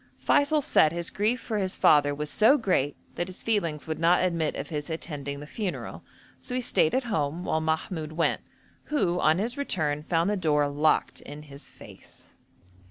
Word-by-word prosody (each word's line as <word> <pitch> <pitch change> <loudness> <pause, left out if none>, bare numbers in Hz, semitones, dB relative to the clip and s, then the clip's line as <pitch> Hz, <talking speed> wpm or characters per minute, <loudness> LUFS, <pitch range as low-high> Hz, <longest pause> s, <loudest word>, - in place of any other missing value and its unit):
Feysul 290 +1 +2
said 155 - +4
his 170 0 -2
grief 220 +5 0
for 220 -2 -3
his 190 -1 -2
father 145 -1 +4
was 150 +1 -3
so 230 +7 +5
great 165 - 0 0.2
that 175 - -3
his 185 - -9
feelings 170 -9 -1
would 160 -1 -4
not 170 +2 +4
admit 165 -4 0
of 140 - -6
his 150 -1 -4
attending 145 -3 -5
the 145 - -8
funeral, 195 +4 -5 0.4
so 250 - -5
he 255 - 0
stayed 160 -9 +2
at 260 - +1
home 165 -7 -2
while 160 - 0
Mahmoud 160 0 -2
went, 165 +1 0 0.4
who 190 - 0
on 155 -1 +3
his 230 +7 -2
return 155 - 0
found 165 +2 0
the 210 - +1
door 150 -6 +1
locked 145 +2 +1
in 145 +1 -10
his 140 -1 -11
face. - - -15
165 Hz, 185 wpm, -27 LUFS, 150-205 Hz, 0.4 s, so